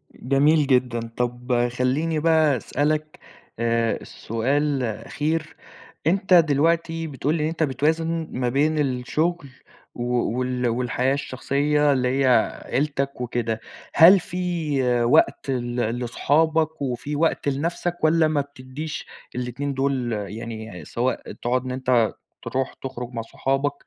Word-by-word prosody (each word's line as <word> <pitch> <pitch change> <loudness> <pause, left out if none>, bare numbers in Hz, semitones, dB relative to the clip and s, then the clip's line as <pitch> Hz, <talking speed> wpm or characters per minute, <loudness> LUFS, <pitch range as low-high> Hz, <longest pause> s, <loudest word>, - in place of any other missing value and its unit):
جميل 145 +3 +3
جدًا، 125 -3 +2 0.2
طَب 120 0 0
خلّيني 140 +6 0
بقى 155 -4 +3
أسألك 155 +5 -1 0.4
آآ، 115 -1 0
سؤال 135 +4 -1
أخير، 155 +8 -3 0.5
أنت 190 +1 +2
دلوقتي 165 +1 +3
بتقول 145 +2 -1
لي 150 - -1
إن - - +1
أنت 165 0 -1
بتوازن 160 +4 0
ما 125 -1 -1
بين 150 +4 +1
الشغل 145 +4 -1 0.5
و 120 - -4
و 120 0 0
وال 125 -1 -1
والحياة 125 +2 0
الشخصية 145 +2 +1
اللي 125 -1 +1 0.2
هي - - +3 0.4
عيلتك 140 -2 -1
وكده، 115 -2 -2 0.3
هل 180 +4 +8
في 160 - -1
وقت 120 +3 +3
ل 120 -2 -2 0.2
لصحابك 155 +5 +1
وفي 135 +3 -3
وقت 155 -1 +1
لنفْسك 170 +5 -2
والّا 160 0 +4
ما 155 -2 +1
بتدّيش 140 +2 -7 0.3
ال2 125 +3 -3
دول 135 -3 0
يعني 110 -3 -6
سواء 125 +1 -2
تقعد 125 +1 -1
إن 130 - -3
أنت 125 -3 +2 0.3
ترُوح 130 0 -2
تخرج 125 -2 -6
مع 115 - -3
صحابك 135 +4 -1
135 Hz, 125 wpm, -23 LUFS, 125-155 Hz, 0.5 s, هل